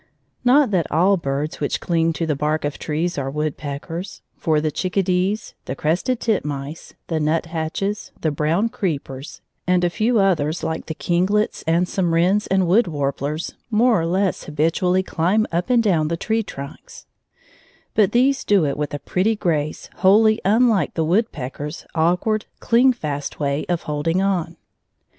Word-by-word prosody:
Not 255 0 +4
that 175 -5 0
all 180 +6 +4
birds 145 -2 -3
which - - -1
cling 165 -1 +1
to 165 - -2
the 155 -2 0
bark 150 +2 -1
of 145 - -3
trees 160 +1 -2
are 135 -1 -2
woodpeckers, 150 +4 -5
for 155 -3 +1
the 155 0 -1
chickadees, 185 +3 -1
the 130 - -4
crested 175 - 0
titmice, 150 - -3
the 160 -2 -2
nuthatches, 165 +5 -2
the 155 - 0
brown 160 +9 +1
creepers, 150 - -4 0.3
and 180 -1 +3
a 175 - +2
few 225 +5 +1
others 170 -5 +1
like 160 0 -3
the 160 - -4
kinglets 190 +7 0
and 170 +2 +2
some 175 -3 0
wrens 190 +5 +2
and 190 -1 +2
wood 195 +5 +4
warblers 145 +1 -2 0.2
more 230 -2 +3
or 165 - -1
less 190 +2 0
habitually 165 +5 +1
climb 190 +5 +1
up 175 +7 -1
and 240 -2 +4
down 165 -8 +2
the 165 +1 -2
tree 220 +5 0
trunks; 195 - -9 0.9
but 210 -4 +3
these 260 +3 +3
do 200 -6 +3
it 140 -1 -1
with 145 -1 -2
a - - -4
pretty 210 +5 +1
grace 155 -7 -2
wholly 215 +4 +4
unlike 220 0 +3
the 160 - +1
woodpecker's 155 - -2
awkward, 180 +6 +1
cling 245 +3 +4
fast 145 - -4
way 140 0 -1
of 175 -1 -1
holding 155 +4 -1
on. 180 -4 -1
170 Hz, 160 wpm, -21 LUFS, 155-200 Hz, 0.9 s, Not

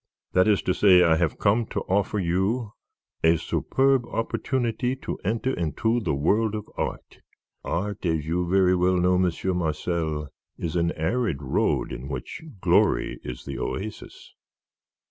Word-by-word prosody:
That 90 +2 +4
is 105 -2 +3
to 90 - +1
say, 90 -3 +6
I 80 -2 +4
have 85 -1 0
come 110 +2 +2
to - - -3
offer 100 +2 0
you 100 +5 0 0.5
a 80 +1 +5
superb 135 - +1
opportunity 125 +1 -1
to 135 - -6
enter 115 +6 0
into 110 - 0
the 85 -11 -1
world 105 +10 +1
of 105 0 -5
art. - - -5 0.4
Art, 100 +4 -3
as 80 -2 0
you 85 +2 -1
very 95 -1 +4
well 90 +1 +2
know, 90 0 +3
Monsieur 90 +1 0
Marcel, 80 -2 -2 0.3
is 85 0 -4
an 85 -1 +2
arid 85 - -1
road, - - 0
in 65 - -6
which 65 -4 -6 0.2
glory - - +2
is 60 - -7
the 70 -1 -5
oasis." 105 +2 -6
90 Hz, 150 wpm, -25 LUFS, 85-110 Hz, 0.5 s, say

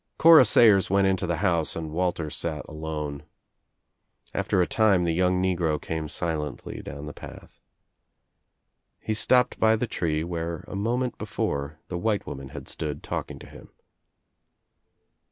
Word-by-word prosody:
Cora 160 -5 +8
Sayers 105 -3 +5
went 100 +1 +3
into 95 -1 +1
the 85 - 0
house 85 -6 +1
and 80 -2 -5
Walter 85 -2 -1
sat 80 -3 -4
alone. 75 -2 -5 1.1
After - - 0
a 90 - +4
time 100 -4 +3
the 85 -1 +1
young 90 +1 +2
negro 85 -5 0
came 80 -1 -4
silently 75 -3 -3
down 70 +2 -8
the 75 - -7
path. - - -12 1.4
He 110 - -1
stopped 125 +3 +2
by 110 0 +4
the 110 - -1
tree 80 -8 -1
where 85 -1 -4
a - - -7
moment 120 +4 -1
before 70 +2 -3
the 90 - -4
white 105 +1 0
woman 70 0 -7
had 70 -2 -9
stood 75 -2 -5
talking - - -4
to - - -12
him. - - -14
85 Hz, 150 wpm, -26 LUFS, 75-100 Hz, 1.4 s, Cora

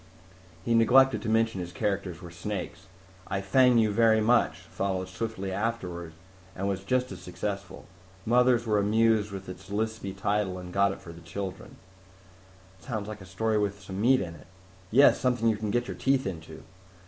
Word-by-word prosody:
He 115 - +1
neglected 130 +4 +5
to 110 - -3
mention 115 -3 +1
his 90 0 -6
characters 100 -4 -3
were 85 - -9
snakes. 95 +1 -6 0.4
I 95 - -2
Fang 125 +6 +4
You 110 -2 +3
Very 110 +1 +4
Much 110 -6 +2
followed 95 +1 -3
swiftly 110 -4 -4
afterward 95 -6 -3 0.4
and 95 +1 -2
was 95 -1 -2
just 125 +4 0
as 90 -2 -8
successful. 90 +2 -5 0.4
Mothers 120 0 +3
were 105 -2 +2
amused 110 0 +2
with 95 -1 -7
its 90 +1 -10
lispy 105 -2 -3
title 100 -1 0
and 90 -1 -8
got 100 0 +3
it - - -8
for 85 - -10
the 85 - -13
children." 95 +3 -7 1.0
"Sounds 110 -5 -5
like 105 -2 -7
a 95 - -11
story 110 +3 0
with 100 -1 -1
some 95 0 -6
meat 130 +3 +4
in 85 -3 -5
it." 85 - -15 0.4
"Yes! 135 +7 +6
Something 125 -3 +1
you 110 - +2
can 105 0 -3
get 120 +3 0
your - - -6
teeth 135 0 +1
into. 80 -4 -7
100 Hz, 180 wpm, -28 LUFS, 95-115 Hz, 1.0 s, Yes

